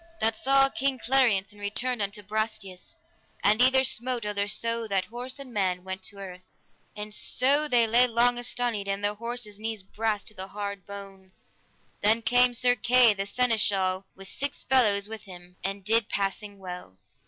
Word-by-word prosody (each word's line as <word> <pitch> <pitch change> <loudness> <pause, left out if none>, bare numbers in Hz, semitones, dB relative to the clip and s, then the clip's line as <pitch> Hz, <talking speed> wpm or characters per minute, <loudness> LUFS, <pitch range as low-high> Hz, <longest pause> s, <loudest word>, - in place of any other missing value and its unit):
That 225 0 +1
saw 270 +3 +4
King 270 0 -1
Clariance 235 -7 +2
and 205 0 -16
returned 240 +4 -2
unto 205 +1 -3
Brastias, 215 - -4 0.5
and 210 +3 +4
either 260 +1 +5
smote 245 -2 0
other 205 -1 -1
so 230 +2 -1
that 195 -2 0
horse 245 +5 -5
and 270 -3 -9
man 185 -3 -1
went 190 0 -6
to - - -4
the 200 - -10
earth, 180 -1 -9 0.5
and 210 0 -6
so 285 +7 +2
they 240 -4 +4
lay 240 +3 +4
long 240 +1 +2
astonied, 240 -4 -1
and 195 +1 -2
their 205 0 +1
horses' 230 -1 -4
knees 220 -2 -4
brast 210 +1 -2
to - - -11
the 190 -2 -7
hard 200 -1 -6
bone. 195 -2 -11 0.7
Then 220 +2 +3
came 245 +1 +4
Sir 245 +1 +3
Kay 245 -2 +5
the 195 0 -4
seneschal 200 -5 +1
with 195 0 -9
six 285 +7 -4
fellows 210 -6 +3
with 220 0 -8
him, 180 -1 -13
and 195 +1 -4
did 225 0 +2
passing 200 +1 -3
well. 180 - -9
215 Hz, 175 wpm, -27 LUFS, 195-245 Hz, 0.7 s, either